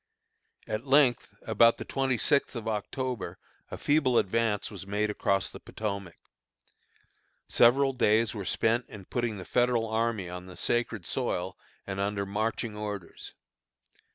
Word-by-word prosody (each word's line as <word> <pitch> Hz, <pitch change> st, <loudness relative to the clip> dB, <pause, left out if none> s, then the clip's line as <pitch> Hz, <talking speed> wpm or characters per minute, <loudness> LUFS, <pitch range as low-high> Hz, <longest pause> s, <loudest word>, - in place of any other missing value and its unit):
At 110 Hz, +5 st, -4 dB
length 135 Hz, -3 st, +4 dB
about 115 Hz, 0 st, +4 dB
the -, -, -6 dB
twenty 135 Hz, -2 st, 0 dB
sixth 140 Hz, +2 st, +1 dB
of 115 Hz, -2 st, -5 dB
October 120 Hz, +3 st, -3 dB, 0.3 s
a -, -, -6 dB
feeble 145 Hz, -5 st, +2 dB
advance 110 Hz, 0 st, +1 dB
was 95 Hz, -2 st, -8 dB
made 105 Hz, +1 st, 0 dB
across 100 Hz, -2 st, +1 dB
the -, -, -10 dB
Potomac. 100 Hz, -5 st, -5 dB, 1.3 s
Several 135 Hz, +3 st, +5 dB
days 115 Hz, -2 st, +3 dB
were 105 Hz, -3 st, -5 dB
spent 115 Hz, +5 st, +1 dB
in 100 Hz, -3 st, -10 dB
putting 120 Hz, -1 st, -2 dB
the 90 Hz, -, -8 dB
Federal 120 Hz, 0 st, +2 dB
army 110 Hz, -3 st, 0 dB
on 90 Hz, +1 st, -7 dB
the 90 Hz, -, -11 dB
sacred 120 Hz, -5 st, 0 dB
soil 95 Hz, -8 st, -2 dB, 0.3 s
and 95 Hz, 0 st, -4 dB
under 100 Hz, 0 st, -1 dB
marching 110 Hz, +2 st, -2 dB
orders. 105 Hz, -3 st, -6 dB
110 Hz, 140 wpm, -29 LUFS, 100-120 Hz, 1.3 s, Several